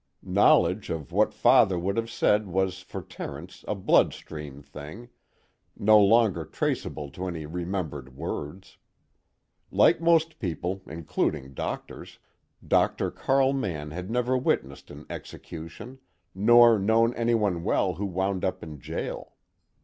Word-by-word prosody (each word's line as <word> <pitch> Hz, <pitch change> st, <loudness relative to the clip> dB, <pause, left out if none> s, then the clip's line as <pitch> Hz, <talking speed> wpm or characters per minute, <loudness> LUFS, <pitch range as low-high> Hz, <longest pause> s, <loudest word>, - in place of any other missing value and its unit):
Knowledge -, -, +3 dB
of 80 Hz, 0 st, -5 dB
what 105 Hz, +4 st, +2 dB
Father 110 Hz, -3 st, +4 dB
would 95 Hz, +3 st, -1 dB
have 115 Hz, 0 st, -2 dB
said 105 Hz, -3 st, +2 dB
was 95 Hz, 0 st, -1 dB
for 95 Hz, -, -8 dB
Terence 85 Hz, +6 st, -9 dB
a -, -, -1 dB
bloodstream 75 Hz, -6 st, 0 dB
thing, 75 Hz, -, -10 dB, 0.7 s
no 110 Hz, +1 st, +6 dB
longer 105 Hz, -4 st, +4 dB
traceable 70 Hz, -1 st, -3 dB
to 90 Hz, +6 st, -5 dB
any 80 Hz, -4 st, -5 dB
remembered 80 Hz, -6 st, -5 dB
words. 90 Hz, +7 st, -6 dB, 0.9 s
Like -, -, +4 dB
most 165 Hz, -1 st, +2 dB
people 90 Hz, -, -3 dB
including 75 Hz, -3 st, -3 dB
doctors, -, -, -6 dB, 0.5 s
Dr. -, -, +2 dB
Carl 135 Hz, 0 st, +2 dB
Mann 80 Hz, -, -3 dB
had 90 Hz, +4 st, -6 dB
never 125 Hz, +2 st, 0 dB
witnessed 130 Hz, -, -1 dB
an 75 Hz, +1 st, -11 dB
execution, 85 Hz, +11 st, -9 dB, 0.3 s
nor 115 Hz, +3 st, +6 dB
known 115 Hz, +4 st, +3 dB
anyone 110 Hz, -8 st, 0 dB
well 95 Hz, -1 st, +1 dB
who 100 Hz, +5 st, -3 dB
wound 95 Hz, +1 st, -2 dB
up 95 Hz, 0 st, -2 dB
in 75 Hz, -3 st, -9 dB
jail. -, -, -6 dB
95 Hz, 125 wpm, -26 LUFS, 80-115 Hz, 0.9 s, no